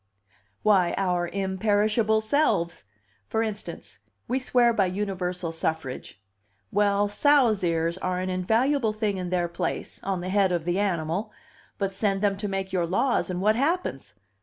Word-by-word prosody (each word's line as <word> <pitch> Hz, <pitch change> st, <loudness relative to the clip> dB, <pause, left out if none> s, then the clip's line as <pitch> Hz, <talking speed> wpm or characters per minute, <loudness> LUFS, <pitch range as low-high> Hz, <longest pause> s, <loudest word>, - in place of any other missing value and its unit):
"Why, 190 Hz, -5 st, +3 dB
our 180 Hz, -2 st, 0 dB
imperishable 210 Hz, +3 st, +1 dB
selves! 215 Hz, -, +1 dB, 0.4 s
For 220 Hz, -, 0 dB
instance: 215 Hz, -1 st, -6 dB, 0.3 s
we 255 Hz, +2 st, 0 dB
swear 245 Hz, -2 st, +3 dB
by 200 Hz, -4 st, +2 dB
universal 180 Hz, -3 st, -3 dB
suffrage. 160 Hz, -9 st, -3 dB, 0.5 s
Well, 205 Hz, 0 st, +2 dB
sows' 240 Hz, -3 st, +3 dB
ears 170 Hz, +1 st, 0 dB
are 185 Hz, -1 st, -1 dB
an 185 Hz, 0 st, -2 dB
invaluable 225 Hz, +6 st, +1 dB
thing 210 Hz, -2 st, -1 dB
in 180 Hz, -1 st, -4 dB
their 175 Hz, -1 st, 0 dB
place, 170 Hz, 0 st, -4 dB
on 190 Hz, -2 st, -2 dB
the 180 Hz, -, -4 dB
head 195 Hz, -1 st, +3 dB
of 170 Hz, -2 st, -1 dB
the 175 Hz, +2 st, 0 dB
animal; 185 Hz, +1 st, -1 dB, 0.5 s
but 195 Hz, -1 st, -1 dB
send 195 Hz, 0 st, -1 dB
them 200 Hz, -1 st, +2 dB
to 210 Hz, -, -3 dB
make 195 Hz, -1 st, -3 dB
your 175 Hz, -2 st, +1 dB
laws, 205 Hz, +6 st, +1 dB
and 180 Hz, 0 st, -3 dB
what 215 Hz, +1 st, +4 dB
happens? 255 Hz, -, -1 dB
195 Hz, 155 wpm, -26 LUFS, 180-215 Hz, 0.5 s, what